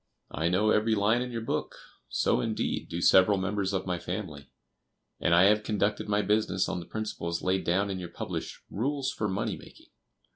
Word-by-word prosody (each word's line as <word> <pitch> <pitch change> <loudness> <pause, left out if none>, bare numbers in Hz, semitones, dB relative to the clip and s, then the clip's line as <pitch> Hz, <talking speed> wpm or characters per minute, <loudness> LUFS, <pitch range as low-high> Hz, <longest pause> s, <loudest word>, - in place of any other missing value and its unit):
I 80 +3 0
know 105 +4 +3
every 110 +1 +3
line 110 +4 +2
in 125 0 -4
your 115 -1 -4
book; - - -2 0.3
so, - - +1
indeed, 110 -1 -2
do 85 +1 -3
several 95 +2 +6
members 95 0 -1
of 95 -1 -2
my 90 -2 -2
family; 85 -8 -6 0.7
and 85 - +3
I 90 - +7
have 105 +2 +5
conducted 105 0 -1
my 105 0 +2
business 105 -3 +1
on - - -2
the 85 - -9
principles 85 -6 -4
laid 95 +1 0
down 100 +4 +1
in 95 - -3
your 90 -2 -6
published - - -5
'Rules 135 +5 -1
for 105 - -2
Money 95 - -2
making. - - -16
100 Hz, 190 wpm, -29 LUFS, 90-110 Hz, 0.7 s, I